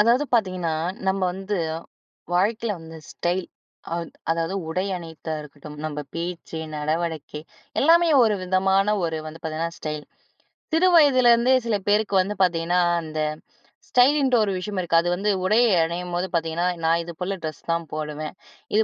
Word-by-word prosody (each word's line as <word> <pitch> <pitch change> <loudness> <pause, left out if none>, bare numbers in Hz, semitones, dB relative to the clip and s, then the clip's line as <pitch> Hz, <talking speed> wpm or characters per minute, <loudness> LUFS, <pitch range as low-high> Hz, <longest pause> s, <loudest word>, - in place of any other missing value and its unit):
அதாவது 235 +6 +4
பாத்தீங்கன்னா, 185 -7 +1 0.3
நம்ம 190 +1 +1
வந்து 195 +2 -3 0.8
வாழ்க்கையில 215 +4 +1
வந்து 160 0 -10
ஸ்டைல். 175 +1 -1 0.5
அத் 170 -1 -4 0.2
அதாவது 165 +2 0
உடை 180 +3 -1
அணியிறதா 160 -2 -7
இருக்கட்டும். 150 0 -11
நம்ம 150 -1 -3 0.2
பேச்சு, 170 -1 -5 0.2
நடவடிக்கை 155 0 -2 0.4
எல்லாமே 335 +3 +5 0.2
ஒரு 215 -2 +2
விதமான 190 +1 +2 0.2
ஒரு 160 -1 -2
வந்து 155 +1 -9
பாத்தீங்கன்னா, 160 +1 -3
ஸ்டைல். 150 -1 -4 0.7
சிறு 335 +3 +4
வயதிலேருந்தே 255 -5 +6
சில 230 -2 +1
பேருக்கு 205 -1 +2
வந்து 200 +3 -3
பார்த்தீங்கன்னா, 175 0 +1 0.2
அந்த 155 -1 -5 0.7
ஸ்டைலின்ட்டு 260 +1 +4
ஒரு 205 - 0
விஷயம் 195 +1 -4
இருக்கு. 170 -1 +2
அது 175 - -1
வந்து 200 +3 -1 0.2
உடையை 225 +5 +4
அணியும்போது 175 +2 -2
பார்த்தீங்கன்னா, 165 +1 0 0.2
நான் 165 +1 +3
இதுபோல 180 +3 -4
ட்ரெஸ் 155 -2 -5
தான் 165 0 -1
போடுவேன். 155 +1 -4 0.4
இது 220 - +5
175 Hz, 140 wpm, -24 LUFS, 160-210 Hz, 0.8 s, வயதிலேருந்தே